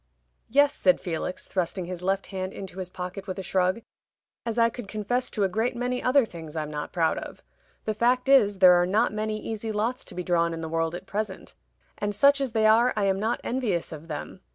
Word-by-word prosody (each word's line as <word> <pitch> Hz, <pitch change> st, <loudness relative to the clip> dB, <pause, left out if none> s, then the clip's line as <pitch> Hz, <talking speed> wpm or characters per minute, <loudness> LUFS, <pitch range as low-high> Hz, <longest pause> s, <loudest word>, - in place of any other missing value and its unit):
"Yes," 285 Hz, +4 st, +4 dB
said 275 Hz, -, +3 dB
Felix, 175 Hz, 0 st, -4 dB
thrusting 185 Hz, 0 st, -2 dB
his 180 Hz, 0 st, -6 dB
left 195 Hz, +2 st, 0 dB
hand 185 Hz, 0 st, -3 dB
into 190 Hz, -1 st, -8 dB
his 185 Hz, -1 st, -5 dB
pocket, 185 Hz, +2 st, -6 dB
with 185 Hz, -, -4 dB
a 190 Hz, -, -4 dB
shrug; 185 Hz, +4 st, +1 dB, 0.6 s
"as 230 Hz, 0 st, -2 dB
I 230 Hz, 0 st, +5 dB
could 240 Hz, -3 st, -8 dB
confess 220 Hz, +5 st, -1 dB
to 210 Hz, -, -1 dB
a -, -, +4 dB
great 220 Hz, +6 st, -1 dB
many 250 Hz, +1 st, -1 dB
other 255 Hz, 0 st, +4 dB
things 165 Hz, -6 st, -10 dB
I'm 155 Hz, -1 st, -3 dB
not 150 Hz, 0 st, -5 dB
proud 165 Hz, -2 st, +1 dB
of. -, -, -10 dB, 0.4 s
The 215 Hz, -, 0 dB
fact 245 Hz, +4 st, +2 dB
is, 225 Hz, -8 st, +5 dB
there 185 Hz, -1 st, +8 dB
are 175 Hz, -, +1 dB
not 210 Hz, +3 st, +2 dB
many 215 Hz, 0 st, -2 dB
easy 220 Hz, 0 st, -4 dB
lots 230 Hz, +5 st, -1 dB
to -, -, -9 dB
be 180 Hz, -, -3 dB
drawn 170 Hz, -1 st, +1 dB
in 165 Hz, -, -6 dB
the 160 Hz, -, -4 dB
world 165 Hz, +1 st, -1 dB
at 175 Hz, -, -8 dB
present; 205 Hz, -2 st, -4 dB, 0.5 s
and 205 Hz, 0 st, -2 dB
such 280 Hz, +3 st, +5 dB
as 260 Hz, -4 st, -2 dB
they 220 Hz, -1 st, +2 dB
are 230 Hz, +3 st, +5 dB
I 210 Hz, -, +1 dB
am 195 Hz, 0 st, +1 dB
not 225 Hz, +3 st, -1 dB
envious 225 Hz, -9 st, -1 dB
of 160 Hz, 0 st, -9 dB
them. 150 Hz, -3 st, -6 dB
200 Hz, 225 wpm, -26 LUFS, 180-230 Hz, 0.6 s, there